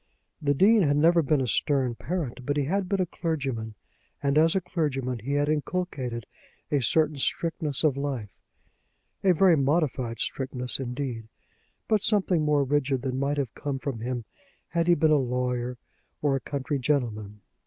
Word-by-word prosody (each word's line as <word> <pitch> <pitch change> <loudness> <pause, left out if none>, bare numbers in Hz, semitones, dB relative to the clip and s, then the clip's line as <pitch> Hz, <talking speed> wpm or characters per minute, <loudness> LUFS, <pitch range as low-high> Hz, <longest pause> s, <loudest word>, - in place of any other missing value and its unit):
The 145 -1 +1
Dean 210 +8 +5
had 145 -4 +3
never 170 +3 +5
been 150 -1 +1
a 130 - -1
stern 130 0 +1
parent; 140 -2 -4
but 145 +3 -1
he 145 - +2
had 185 +6 -1
been 195 -2 +1
a - - +2
clergyman, 135 -11 -3 0.5
and 140 0 +2
as 160 +3 +5
a - - +4
clergyman 135 -8 -2
he 135 +6 -4
had 145 0 +2
inculcated 145 - -2 0.5
a 145 -2 +2
certain 155 +5 +2
strictness 155 0 -1
of 150 -4 +3
life, 135 -8 -3 0.9
a 190 - +5
very 180 0 +5
modified 135 -5 0
strictness, 125 0 -2
indeed, 125 -3 -4 0.6
but 215 -2 +2
something 190 -6 +2
more 150 -1 +3
rigid 135 -2 0
than 130 -1 -2
might 140 +1 0
have 135 -5 -2
come 140 -2 -3
from 135 -3 -4
him 120 0 -3 0.4
had 170 0 0
he 175 - +6
been 160 -2 +3
a 150 - +6
lawyer 125 -1 -1 0.4
or 145 -2 +1
a - - 0
country 140 +1 -3
gentleman. 110 -7 -1
140 Hz, 170 wpm, -27 LUFS, 125-160 Hz, 0.9 s, he